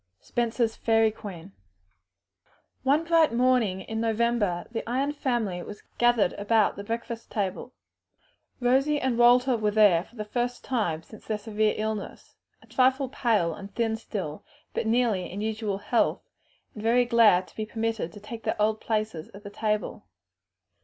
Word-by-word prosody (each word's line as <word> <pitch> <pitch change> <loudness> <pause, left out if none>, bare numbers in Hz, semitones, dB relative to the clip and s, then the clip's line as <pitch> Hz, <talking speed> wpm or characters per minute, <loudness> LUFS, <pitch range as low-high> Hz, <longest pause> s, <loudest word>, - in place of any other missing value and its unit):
Spenser's 235 -1 -1
"Fairy 225 -1 +3
Queen." 195 -4 -9 1.3
One 285 +4 +2
bright 330 -3 +4
morning 235 -6 +2
in 220 +3 -4
November 225 -5 0
the 230 - -2
Ion 270 +4 0
family 240 -11 -1
were 205 - -8 0.2
gathered 240 -6 +3
about 215 +1 +2
the 200 - -7
breakfast 230 +1 -5
table. 200 +4 -3 0.8
Rosie 270 +4 +2
and 260 -3 0
Walter 250 +2 +5
were 215 -2 +1
there 205 -5 +5
for 230 - -21
the 215 -2 -5
first 245 +3 -2
time 175 -11 -1
since 215 - -15
their 215 - -1
severe 215 0 0
illness, 215 -1 -4 0.3
a - - -17
trifle 260 +1 +2
pale 215 -11 +1
and 200 +2 -10
thin 225 -1 0
still, 190 -9 -5 0.3
but - - -2
nearly 225 -6 +1
in 195 - -5
usual 215 -2 -2
health, 205 +4 0 0.5
and 210 - -8
very 240 +3 +3
glad 225 -6 +5
to - - -23
be 215 -1 -4
permitted 225 -5 -2
to 205 - -11
take 225 +2 -8
their - - -2
old 215 +1 +1
places 215 -7 -2
at 200 - -12
the 205 - -8
table. 210 0 -2
220 Hz, 160 wpm, -27 LUFS, 205-240 Hz, 1.3 s, Walter